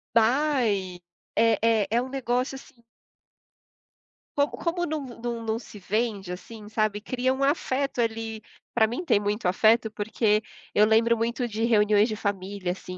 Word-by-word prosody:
Vai 230 -7 +2 0.3
é 225 -1 +4
é 225 -2 +3
é 235 +2 +2
um 255 - -4
negócio, 255 -1 -1
assim 255 -3 -14 1.5
Com 285 0 +3
como 350 +1 -2
não 310 0 -2
não 235 -1 -5
não 220 +1 -1
se 225 - -12
vende, 205 -1 -2
assim, 210 +4 -9
sabe, 215 -1 0
cria 255 +4 -1
um 265 +1 -1
afeto 275 -2 0
ali 225 -1 -3 0.3
pra 220 -2 +4
mim 245 +11 -4
tem 205 - +4
muito 205 -1 -1
afeto, 220 +4 +3
porque 210 0 +1 0.3
eu 210 +1 +5
lembro 230 +1 +4
muito 235 +2 -1
de 220 0 -3
reuniões 210 -1 +4
de 215 - -2
família, 200 -2 -3
assim, 185 0 -7
225 Hz, 155 wpm, -26 LUFS, 210-245 Hz, 1.5 s, eu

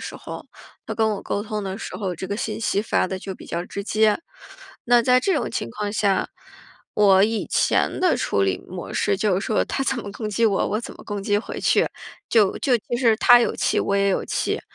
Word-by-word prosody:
时 - - -7
候， - - -9 0.4
他 - - -4
跟 220 -1 +2
我 200 -2 -4
沟 205 - -2
通 210 -1 -4
的 195 0 -5
时 - - -6
候， 190 -4 -3
这 190 - -5
个 200 +2 -3
信 230 - -3
息 205 -2 0
发 215 - +1
得 190 0 -4
就 190 0 -6
比 - - -13
较 170 +1 -3
直 200 +2 -6
接。 215 0 +2 0.7
那 240 0 +5
在 250 +1 +4
这 385 - +1
种 300 - -1
情 115 - -3
况 205 - -4
下， 200 -3 +1 0.7
我 195 -2 +5
以 220 +1 0
前 - - +1
的 365 -2 +3
处 100 - 0
理 95 -1 +1
模 180 -1 -7
式 200 -1 +1
就 195 -2 +1
是 200 - -4
说 215 - +1
他 270 - -2
怎 270 - 0
么 205 -3 -6
攻 215 0 -5
击 220 +2 0
我， 205 -3 +2
我 215 - -1
怎 - - -8
么 - - -14
攻 205 -2 -4
击 205 +1 +1
回 210 - -6
去。 - - +3 0.4
就 210 -4 +3
就 260 -4 +2
其 240 +2 -4
实 235 -3 +3
他 245 - +7
有 235 - 0
气 - - 0
我 200 - 0
也 200 0 +2
有 195 - 0
气， - - -1
210 Hz, 255 characters per minute, -23 LUFS, 195-225 Hz, 0.7 s, 他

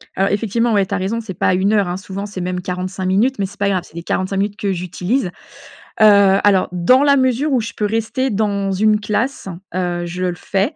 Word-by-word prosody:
Alors, 195 +1 +1
effectivement, 225 +2 0
ouais, 200 -2 +3
tu 200 - -6
as - - 0
raison, 200 +5 -2
c'est 205 -4 -7
pas - - -1
à - - +3
1 195 +3 +1
heure, 200 -4 +2
hein. 175 +1 -3
Souvent, 195 +1 -6
c'est 195 -3 -6
même 180 0 -3
45 185 +1 -4
minutes, 210 +7 +1
mais 195 - +1
c'est 205 +2 -10
pas 200 0 +1
grave, 185 -3 0
c'est 165 - -19
les 170 - -6
45 190 +2 -2
minutes 205 +1 -1
que 200 -3 -1
j'utilise. 180 +4 -2 0.7
Heu, 200 -2 +6
alors, 195 -2 +3
dans 250 +11 +3
la 280 -1 +4
mesure 260 +3 +1
où 245 - +2
je 215 -1 -6
peux 210 - -1
rester 225 +5 -1
dans 200 -2 0
une 210 +2 +2
classe, 215 +3 -2 0.3
heu, 175 -1 -2
je 180 +2 -5
le 175 -1 -1
fais, 200 - -1
200 Hz, 240 wpm, -18 LUFS, 185-220 Hz, 0.7 s, Heu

